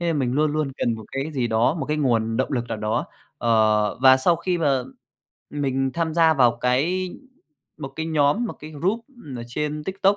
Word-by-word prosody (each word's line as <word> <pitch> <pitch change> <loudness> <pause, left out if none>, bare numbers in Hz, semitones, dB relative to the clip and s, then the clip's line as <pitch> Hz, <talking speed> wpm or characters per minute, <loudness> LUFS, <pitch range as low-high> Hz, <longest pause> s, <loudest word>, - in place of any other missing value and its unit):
Thế 175 - -2
nên 160 -3 +1
mình 125 -2 0
luôn 150 +2 +1
luôn 150 -3 -1
cần 120 - 0
một 110 -1 -9
cái 135 +4 -3
gì 130 -4 0
đó, 115 +6 +2
một 140 -6 -4
cái 150 +1 -1
nguồn 115 -5 +1
động 130 - -1
lực 120 -2 0
nào 115 - -3
đó. 105 0 -1 0.3
Ờ, 110 -2 +2
và 130 0 +8
sau 165 +6 +2
khi 175 +1 -1
mà 140 -5 +2 0.7
mình 135 -2 -1
tham 165 -2 -1
gia 165 -1 +5
vào 120 -4 +4
cái 170 +9 +1 0.7
một 140 - -5
cái 160 0 -3
nhóm, 155 +7 +2
một 230 - -3
cái 155 - -9
group 190 +10 -2 0.3
ở 120 - -6
trên 150 +3 -3
TikTok, 195 +1 +1
145 Hz, 215 wpm, -23 LUFS, 125-160 Hz, 0.7 s, và